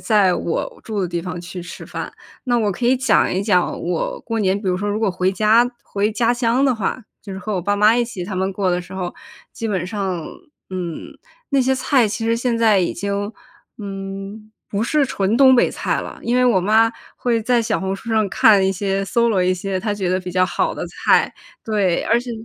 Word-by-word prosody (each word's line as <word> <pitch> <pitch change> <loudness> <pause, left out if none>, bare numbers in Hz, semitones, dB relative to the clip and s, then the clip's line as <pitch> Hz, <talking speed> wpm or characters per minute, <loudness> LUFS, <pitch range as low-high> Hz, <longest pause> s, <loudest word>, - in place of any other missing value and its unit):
在 205 -5 +3
我 170 - -3
住 215 -2 -4
的 185 - 0
地 170 0 -3
方 180 0 -5
去 175 +1 -7
吃 170 - -9
饭。 - - -6 0.3
那 245 -3 +2
我 210 -3 +1
可 240 +6 -2
以 255 +1 +4
讲 255 -3 +3
一 185 - 0
讲 185 -4 +1
我 175 -1 -2
过 225 -1 -3
年， 195 0 +1
比 200 - -7
如 180 -1 +1
说 205 +2 -2
如 205 +1 -1
果 220 -3 +1
回 180 +1 0
家 220 +5 +3
回 205 +2 -1
家 235 +2 +1
乡 245 +2 +1
的 265 -3 +3
话， 225 +3 -3 0.2
就 200 - -11
是 190 - -5
和 215 +2 -4
我 185 - 0
爸 205 +3 0
妈 210 +2 +5
一 240 - +2
起 215 -7 -5
他 195 0 -5
们 190 +1 0
过 190 -1 0
的 180 - 0
时 180 +1 -11
候， 180 -2 -4 0.4
基 225 - -4
本 185 -4 -1
上， 190 -5 -3 0.5
嗯， 175 -3 -6 0.3
那 275 -2 +3
些 265 +1 +2
菜 255 -3 +2
其 225 +2 -3
实 230 0 +2
现 240 0 0
在 220 -3 +4
已 180 - 0
经， 200 +2 -2 0.5
嗯， 195 +1 -7 0.2
不 205 +2 -1
是 295 +4 +2
纯 200 -3 0
东 260 -1 +7
北 240 - +3
菜 - - -1
了。 - - -8
因 240 +1 0
为 250 - +4
我 230 -7 +4
妈 220 +4 +3 0.2
会 235 -2 0
在 235 +1 +2
小 - - -1
红 190 0 -2
书 230 +4 -8
上 220 -2 +2
看 200 0 +5
一 190 - +2
些， 195 +1 -1
搜 235 +5 +2
罗 190 -4 +2
一 185 +1 +2
些 190 +1 -3
她 210 +1 -1
觉 190 -3 -2
得 185 +1 +1
比 180 - -6
较 185 +1 +3
好 185 - -1
的 - - -4
菜。 - - +2 0.3
对， 200 -5 +1
而 230 +2 +2
且 245 - -7
205 Hz, 250 characters per minute, -20 LUFS, 185-230 Hz, 0.5 s, 东